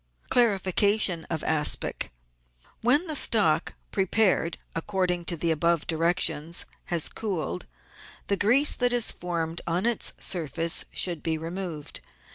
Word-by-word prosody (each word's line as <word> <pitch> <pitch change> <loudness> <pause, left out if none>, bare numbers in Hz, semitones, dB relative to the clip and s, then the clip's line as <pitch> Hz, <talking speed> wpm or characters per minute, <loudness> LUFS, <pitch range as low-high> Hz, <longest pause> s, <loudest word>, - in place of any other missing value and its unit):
Clarification 200 -5 +2
of 160 -2 -3
Aspic. 150 - +1 0.4
— - - -33
When 280 +9 +3
the 315 -3 -2
stock, 175 - +2 0.2
prepared 190 -3 +1 0.2
according 180 0 -2
to 170 - -1
the 165 +1 0
above 170 0 +1
directions, 165 -1 +1 0.2
has 170 -3 0
cooled, 170 - -4 0.6
the 200 - +1
grease 250 +9 +4
that 245 -1 +2
has 240 -2 +4
formed 170 -2 -4
on 175 +4 0
its 235 -2 +1
surface 165 -1 0
should 175 -4 +1
be 160 -1 -2
removed. 165 -2 -6
175 Hz, 125 wpm, -26 LUFS, 160-205 Hz, 0.6 s, grease